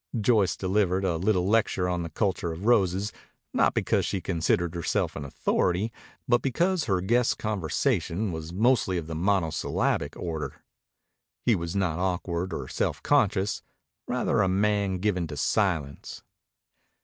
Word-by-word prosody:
Joyce 105 -3 +3
delivered 95 -1 +1
a 85 -3 +1
little 95 0 +1
lecture 105 -4 +2
on 90 -1 -1
the 85 - -4
culture 90 -1 -1
of 85 +5 -7
roses, 100 -3 +2 0.4
not - - +3
because - - +1
she 100 - -1
considered 85 -1 0
herself 85 -2 -1
an 70 - -5
authority, 90 +9 0 0.3
but 120 0 +3
because 170 +6 +1
her 95 -5 +1
guest's 120 +5 +2
conversation 100 - -1
was 80 0 -6
mostly 105 -1 +2
of 85 - -3
the 80 - -6
monosyllabic 85 -1 0
order. 80 -3 -4 0.9
He 120 - +5
was 85 -2 -3
not 90 -4 0
awkward 90 -1 -1
or - - -4
self - - -2
conscious; 95 +2 +2 0.5
rather - - +1
a 100 - +3
man 100 0 +1
given 90 -3 0
to 75 -1 -7
silence. 80 -7 -1
95 Hz, 145 wpm, -27 LUFS, 85-105 Hz, 0.9 s, He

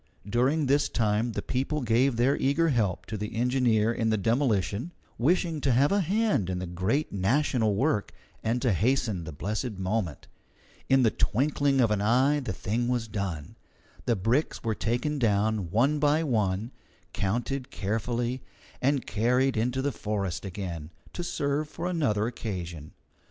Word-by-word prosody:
During 130 +8 +2
this 140 +2 +2
time 110 +1 0
the - - -3
people 140 +4 -1
gave 120 +2 +2
their 125 +4 +3
eager 150 +5 +2
help 100 - 0
to 110 - -5
the 105 +2 -5
engineer 120 -2 +2
in 115 -1 0
the 110 - +2
demolition, 115 - 0 0.3
wishing 165 +3 +1
to 135 - +2
have 140 +4 +3
a 200 - +3
hand 195 - +1
in 90 - -1
the 90 - -3
great 95 - -1
national 110 +2 +1
work 120 -2 0 0.3
and 120 +3 0
to 120 -5 +3
hasten 105 - 0
the 80 - -6
blessed 105 - -3
moment. 95 -3 -3 0.6
In 135 -1 +5
the 110 - +4
twinkling 140 +2 +1
of 115 -4 +3
an 105 -1 +1
eye 130 +7 +3
the 125 -6 -4
thing 110 +7 -2
was 120 -2 -1
done. 95 -8 -4 0.5
The 120 - +3
bricks 115 +10 0
were 115 -2 0
taken 120 +8 -1
down 105 -4 +1
one 135 - +2
by 150 +2 +3
one, 110 -4 0 0.4
counted 120 +6 -2
carefully, 120 +4 -2 0.4
and 135 -1 +1
carried 125 +4 +1
into 125 +4 0
the 145 - +1
forest 100 -5 -3
again, 85 -5 -5 0.2
to 175 - -4
serve 145 -2 -1
for 165 - -6
another 145 -13 +1
occasion. 90 -9 -5
115 Hz, 160 wpm, -28 LUFS, 105-135 Hz, 0.6 s, In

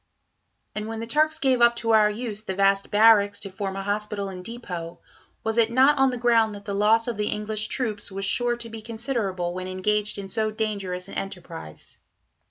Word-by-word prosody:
And 210 0 -4
when 225 0 -5
the 230 - -4
Turks 310 +6 +1
gave 265 -5 +2
up 235 0 +6
to 230 -1 -1
our 215 -1 +5
use 215 -1 -4
the 190 -3 -5
vast 195 0 +2
barracks 205 -1 +5
to 195 - -6
form 195 0 -4
a 195 - -4
hospital 205 0 -2
and 180 -1 -8
depot, 180 -7 -7 0.4
was 225 +1 0
it 225 -1 +4
not 265 +4 +4
on 270 0 +5
the 250 - -3
ground 230 -3 +3
that 200 0 -11
the 200 - -3
loss 215 +3 +3
of 235 -3 -3
the 210 0 -1
English 210 0 -2
troops 215 -5 -2
was 195 +1 -3
sure 240 +4 +1
to 235 - -4
be 225 0 -8
considerable 220 -6 -2
when 185 0 -5
engaged 210 +3 -1
in 200 -1 -6
so 215 +2 -1
dangerous 200 -4 -3
an - - -11
enterprise? 175 - -8
210 Hz, 205 wpm, -25 LUFS, 195-230 Hz, 0.4 s, up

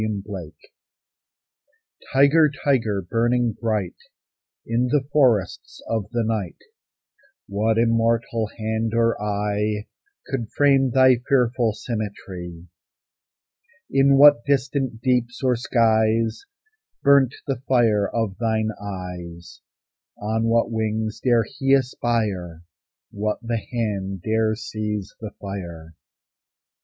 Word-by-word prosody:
THE 110 - 0 0.2
TIGER 85 -6 -7 1.6
Tiger, 145 +3 +5 0.2
tiger, 115 -8 +1
burning 120 +4 +1
bright 105 -4 -2 0.7
In 120 +2 0
the 140 +2 +1
forests 120 -11 +1
of 110 -4 -2
the 120 -1 -1
night, 110 -5 -2 0.9
What 110 +2 0
immortal 115 -1 +1
hand 110 0 -2
or 115 0 +2
eye 105 0 -1 0.4
Could 120 -5 -4
frame 135 -2 +4
thy 130 0 +5
fearful 125 -4 +2
symmetry? 95 -6 -6 1.3
In 135 0 +4
what 145 -3 +7
distant 135 -4 -1
deeps 125 -1 0
or 130 -1 +3
skies 115 - +1 0.6
Burnt 140 -3 +4
the 135 -3 -3
fire 110 -6 +3
of 110 -5 -2
thine 110 -2 0
eyes? 90 -3 -8 0.6
On 110 +2 -1
what 115 0 +2
wings 110 0 -2
dare 120 -3 +3
he 135 +5 -1
aspire? 110 -10 -2 0.5
What 105 +1 -2
the 115 -1 -2
hand 100 -6 -3
dare 110 0 +1
seize 105 -2 -4
the 110 - -6
fire? 85 -5 -7
115 Hz, 105 wpm, -23 LUFS, 105-125 Hz, 1.6 s, what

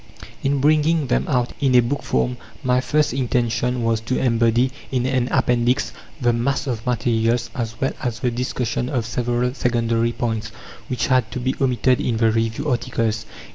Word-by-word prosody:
In 140 0 +1
bringing 155 +1 +3
them 125 - 0
out 125 -4 0
in 135 -3 +2
a - - +8
book 125 +4 0
form 65 -1 0 0.3
my 125 0 +2
first 150 0 +1
intention 125 -1 0
was 115 -1 +1
to 130 +3 -1
embody 120 +1 +2 0.2
in 125 -2 0
an 130 -2 +1
Appendix 125 -1 +2 0.3
the 120 -3 +2
mass 125 +4 0
of 120 -5 -3
materials, 115 0 +1
as 115 -2 -4
well 135 - 0
as 120 -3 -2
the 125 - 0
discussion 125 0 -2
of 120 -5 -1
several 120 +1 -1
secondary 115 -3 +1
points, 110 -4 -2 0.4
which 125 -4 -1
had 130 -4 +2
to - - -3
be 130 +2 0
omitted 125 -1 +2
in 115 - 0
the 110 0 +3
review 115 +6 -1
articles. 115 -3 -1
120 Hz, 175 wpm, -21 LUFS, 115-130 Hz, 0.4 s, a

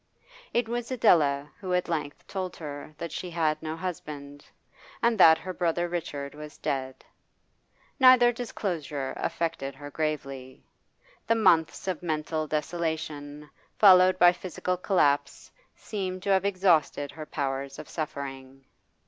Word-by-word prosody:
It 240 -1 +1
was 240 0 -3
Adela 150 - +3
who 185 -3 -1
at 180 - 0
length 150 -4 -4
told 185 -2 -4
her 145 -1 -8
that 170 0 -5
she 180 - -5
had 155 -2 0
no 160 0 -4
husband, 145 -5 -6 0.6
and 235 -1 +2
that 160 -3 +8
her 185 +2 -6
brother 175 0 0
Richard 155 -5 -4
was 150 0 -10
dead. 130 -1 -4 0.9
Neither 255 -2 +7
disclosure 170 - -4
affected 160 -5 -3
her 145 +1 -9
gravely. 135 -4 -4 0.6
The 230 - +4
months 180 -6 +3
of 185 -4 -2
mental 155 -1 -2
desolation 150 -2 -3 0.3
followed 185 -2 +7
by 175 0 +7
physical 180 0 -3
collapse 175 -6 +1 0.2
seemed 185 -3 -5
to 200 - 0
have 190 0 +3
exhausted 175 -7 +2
her 155 +1 -9
powers 135 -1 -3
of - - -9
suffering. 135 -3 -6
160 Hz, 130 wpm, -27 LUFS, 145-185 Hz, 0.9 s, that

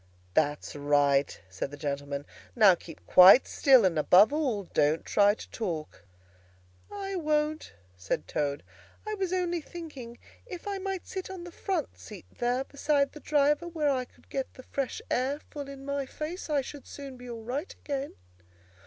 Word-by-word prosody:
"That's 145 +2 0
right," 145 -1 +2
said 95 +7 -4
the 145 - -9
gentleman. 140 -1 -4 0.3
"Now 210 -5 +7
keep 165 -2 -10
quite 185 +8 +8
still, 260 -6 +5
and, 165 -4 +2
above 195 - +6
all, 260 -10 0
don't 155 -2 +1
try 205 0 +4
to - - -11
talk." 165 - -5 0.9
"I 390 -1 -4
won't," 305 -2 -1 0.2
said 90 -2 -3
Toad. 145 -1 -2 0.4
"I 430 - -3
was 385 -4 -2
only 350 -2 0
thinking, 290 -8 -9 0.3
if 365 -2 -8
I 400 -1 -2
might 385 -1 -4
sit 375 -1 -6
on 375 -2 -7
the 350 - -9
front 360 -3 -3
seat 205 -5 -11
there, 245 +2 0
beside 280 0 0
the 300 - -11
driver, 295 +3 +2
where 310 -4 0
I 255 -2 -1
could - - -26
get 270 -1 -3
the 255 - -11
fresh 275 -1 -4
air 265 +4 0
full 285 -2 -6
in 275 0 -9
my 280 -1 -2
face, 315 +6 -6
I 290 -2 +2
should 280 +1 -10
soon 275 -2 -8
be 250 0 -11
all 230 -1 -7
right 270 +9 -4
again." 280 -1 -5
270 Hz, 170 wpm, -29 LUFS, 185-310 Hz, 0.9 s, quite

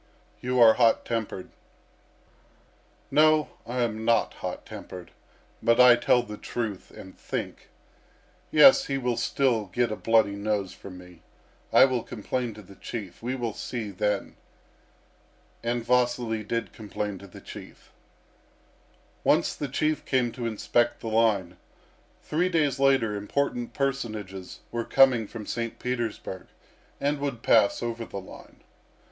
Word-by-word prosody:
"You 125 0 -1
are 115 -2 +8
hot 115 -1 +3
tempered." 110 -5 -4 1.6
"No, 155 0 +4 0.2
I 125 +1 -2
am 110 -1 -2
not 115 0 +2
hot - - -6
tempered, 90 -2 -9 0.5
but 115 +1 +3
I 125 -1 +9
tell 120 0 +3
the 105 -3 -8
truth 110 -5 -4
and 95 - -12
think. - - -6 0.8
Yes, 270 - +7
he 135 - -1
will 125 -2 -1
still 115 -1 +1
get 115 +5 -1
a - - -1
bloody 110 -3 +2
nose 100 -2 -2
from 95 -2 -11
me. 90 -2 -14 0.5
I - - +8
will 130 -3 0
complain 120 +1 -4
to 105 - -11
the 100 +1 -14
Chief. 100 -7 -7
We 125 +3 -2
will 120 -4 -3
see 110 -3 -5
then!" 100 +1 -2 1.3
And 120 0 -1
Vasily 120 -3 +1
did 110 -2 -3
complain 105 -2 -5
to 100 - -12
the 90 - -12
Chief. - - -12 1.3
Once - - +2
the 145 - -4
Chief 150 +3 -1
came 125 -3 +1
to 120 -1 -4
inspect 120 +2 0
the 115 - -4
line. 105 -6 +1 0.7
Three 175 +4 0
days 150 -6 +1
later 135 -6 +3
important 120 +4 -2
personages 110 -9 -4
were 120 0 -2
coming 125 -3 +4
from 110 -1 -8
St. 115 0 -4
Petersburg 115 -6 -4 0.5
and 145 +1 0
would 140 -5 -4
pass 110 +1 +4
over 115 0 -3
the 100 - -6
line. 95 - -14
115 Hz, 140 wpm, -26 LUFS, 105-125 Hz, 1.6 s, I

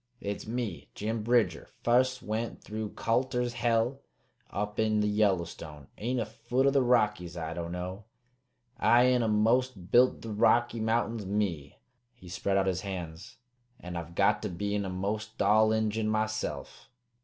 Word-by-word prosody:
It's 100 +1 -5
me, 115 -6 -4
Jim 110 +2 -2
Bridger, 110 -6 +1 0.2
fust 130 +1 +2
went 110 +2 -3
through 110 0 -5
Colter's 125 +1 0
Hell 120 +3 +1 0.5
up 105 +1 -4
in 110 -1 +2
the 105 - +2
Yellowstone. 85 -8 -1
Ain't 125 +4 -1
a 115 - -1
foot 120 +5 -1
o' 140 - +5
the 135 -1 +3
Rockies 105 -8 +1
I 80 -1 -4
don't 85 0 -5
know. 90 +3 -5 0.7
I 125 +2 +5
eena 120 -2 +2
most 110 -2 +1
built 125 +1 +4
the 115 - -5
Rocky 120 +2 +3
Mountains, 110 -1 0
me." 95 -8 -2 0.4
He 95 -7 -14
spread 95 +2 0
out 95 - +2
his 90 -1 0
hands. 90 -5 -7 0.4
"And 90 0 -7
I've 85 0 -6
got 105 +2 +3
to 105 - -3
be 100 +3 -3
eena'most 105 +3 -3
all 110 +2 +4
Injun 110 0 0
myself." 110 0 -3
110 Hz, 155 wpm, -29 LUFS, 95-115 Hz, 0.7 s, o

